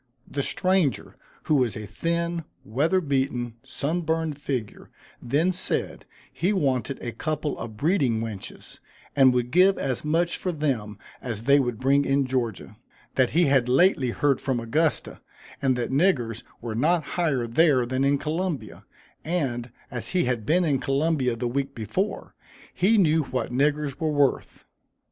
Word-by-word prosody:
The 145 - -2
stranger, 185 -2 0 0.3
who - - 0
was 125 -8 +2
a 105 - -6
thin, 170 - -2 0.2
weather 150 - +1
beaten, 130 -5 -1
sun 160 +9 -2
burned 160 -2 -1
figure, 125 -7 -4 0.3
then 150 +9 +1
said, 185 +1 -2 0.3
he 180 +4 0
wanted 135 - 0
a 120 - -3
couple 150 +5 -3
of 110 -2 -7
breeding 140 - +1
wenches, 110 -4 -7 0.4
and 135 -2 +6
would 125 -1 -1
give 185 +3 +5
as 130 -3 -2
much 165 +3 +1
for 185 - -2
them 130 - -2 0.2
as 115 -3 -4
they 140 +3 +5
would 125 -4 -1
bring 140 +2 +3
in 140 0 +1
Georgia 120 -5 -3 0.4
that 130 -2 +3
he 175 - +6
had 135 -3 +3
lately 135 -2 +4
heard 140 +2 +1
from 130 -3 -1
Augusta, 150 +8 -1 0.4
and 130 -2 +2
that 120 0 -2
niggers 130 - +1 0.2
were 115 -1 -4
not 155 +8 +2
higher 150 -9 0
there 130 +1 +3
than 130 +2 -1
in 140 +1 +3
Columbia, 155 - -4 0.4
and, 135 -8 -2 0.2
as 120 +6 -5
he 175 - +3
had 120 -4 -2
been 175 +3 +3
in 140 -4 +1
Columbia 135 -3 +1
the 120 +1 -2
week 140 +2 -2
before, 155 - -3 0.4
he 200 +5 +3
knew 160 -5 +4
what 130 -2 -3
niggers 145 +1 0
were 160 - 0
worth. 145 -3 0
140 Hz, 160 wpm, -25 LUFS, 120-160 Hz, 0.4 s, and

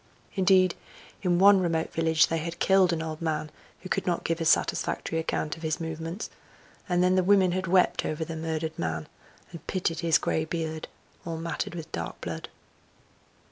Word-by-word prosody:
Indeed, 185 -2 +4 0.5
in 180 -3 +2
one 200 +1 +7
remote 165 -2 -1
village 160 0 +4
they 165 - -1
had 170 +2 -5
killed 190 -2 +4
an 165 -1 -1
old 160 0 -5
man 155 -2 -2 0.3
who 185 - -7
could - - -1
not 175 -1 0
give 165 0 -1
a - - 0
satisfactory 160 +1 +1
account 155 -1 -2
of 165 - -13
his 155 -1 -1
movements, 165 +4 -5 0.6
and 180 0 +3
then 180 0 +4
the 185 0 +3
women 190 -1 +4
had 185 +1 -2
wept 180 +1 +3
over 155 +1 -2
the 165 - -6
murdered 160 0 -3
man, 80 -1 -2 0.4
and 170 - -11
pitied 170 -4 -1
his 165 -1 +4
grey 160 - 0
beard 160 -1 -4 0.4
all 165 -1 -4
matted 170 +1 -3
with 160 -1 -7
dark 85 -1 -5
blood. - - -6
165 Hz, 180 wpm, -27 LUFS, 160-180 Hz, 0.6 s, one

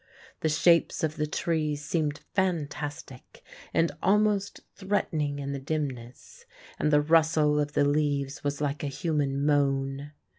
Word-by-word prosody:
The 160 - 0
shapes 170 +3 +3
of 155 -1 -1
the 150 0 -1
trees 150 -2 -1
seemed 150 -2 -1
fantastic 150 -7 -3 0.3
and 165 0 +2
almost 205 0 +1
threatening 160 -7 -1
in 140 0 -4
the 140 - -4
dimness, 140 - -5 0.4
and 150 - +1
the 145 0 +5
rustle 155 -1 +3
of 145 0 -1
the 145 - +3
leaves 145 -1 0
was 145 0 -2
like 145 0 -2
a - - -1
human 140 -2 -1
moan. 140 0 0
150 Hz, 140 wpm, -27 LUFS, 145-160 Hz, 0.4 s, the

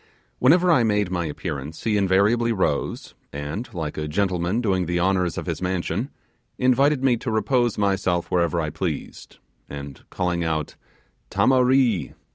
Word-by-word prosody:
Whenever 175 +7 +5
I 135 - +5
made 105 -4 +1
my 85 -3 -1
appearance 75 -1 -6
he 110 -2 +1
invariably 105 +4 +2
rose, 85 -9 -1 0.2
and 75 - -5
like 80 -6 -4
a 75 - -3
gentleman 90 +4 0
doing 95 -7 0
the 90 0 0
honours 90 -1 +1
of - - -4
his - - -4
mansion, 90 -1 -2 0.5
invited 130 +2 +3
me 125 -3 +3
to 120 - -5
repose 120 +1 +1
myself 95 -4 0
wherever 85 -1 +1
I 75 -2 -2
pleased, - - -5 0.3
and 70 -1 -8
calling 90 -1 -1
out 80 -2 -2 0.5
'tamaree! 125 - +2
95 Hz, 145 wpm, -23 LUFS, 85-120 Hz, 0.5 s, Whenever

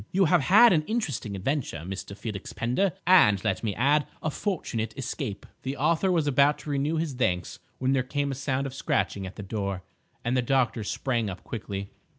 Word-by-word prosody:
You 190 +1 +3
have 170 0 +4
had 205 - +7
an 160 - +3
interesting 145 - -2
adventure, 100 - -2
Mr. 95 +1 -6
Felix 105 -4 -6
Pender, 130 +11 0
and, 105 - +6
let 100 -3 -1
me 105 -4 -1
add, 145 +5 +3 0.2
a 155 - 0
fortunate 120 - -3
escape." 120 -6 -4 0.2
The 135 +2 -4
author 165 +7 +2
was 165 -4 +2
about 145 +1 +4
to 150 - -5
renew 145 +3 0
his 160 -3 -1
thanks 90 -9 -1 0.2
when 130 +1 +1
there 135 - +3
came 140 +2 -2
a - - -2
sound 135 0 -1
of 135 - -5
scratching 100 -7 -1
at 95 - -10
the 105 - -7
door, 100 -2 -3 0.4
and 120 +2 +1
the 125 - +3
doctor 125 -3 +1
sprang 115 0 -1
up 95 -1 -8
quickly. 100 -3 -5
130 Hz, 195 wpm, -27 LUFS, 105-150 Hz, 0.4 s, had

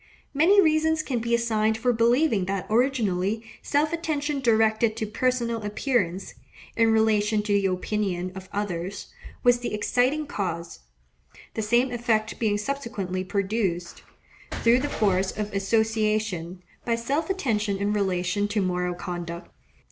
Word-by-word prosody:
Many 340 +8 +5
reasons 315 -2 +3
can 255 -5 -2
be 235 +1 +1
assigned 220 -2 +1
for 245 +2 +1
believing 235 -2 +2
that 195 0 -2
originally 220 -4 +1 0.2
self 300 +3 +1
attention 300 -3 -1
directed 220 -2 +2
to 220 - -1
personal 235 +1 -1
appearance, 205 -4 -1 0.4
in 225 -1 +4
relation 215 -1 +2
to 210 -1 0
the 200 -1 +3
opinion 185 -1 -2
of 190 0 -10
others, 190 -2 -4 0.3
was 245 -1 +5
the 240 -3 -3
exciting 255 +8 +1
cause; 170 - -4 0.7
the 220 - -2
same 240 +4 +2
effect 225 -2 0
being 210 -3 +1
subsequently 205 -7 -3
produced, 190 -2 -2 0.6
through 235 +2 +5
the 290 +2 -2
force 195 -5 0
of 210 -1 -3
association, 215 -4 0 0.2
by 235 - +1
self 275 +9 -2
attention 215 - 0
in 200 +1 0
relation 195 0 0
to 205 +1 -1
moral 180 -2 -1
conduct. 175 -1 -6
215 Hz, 135 wpm, -25 LUFS, 195-245 Hz, 0.7 s, Many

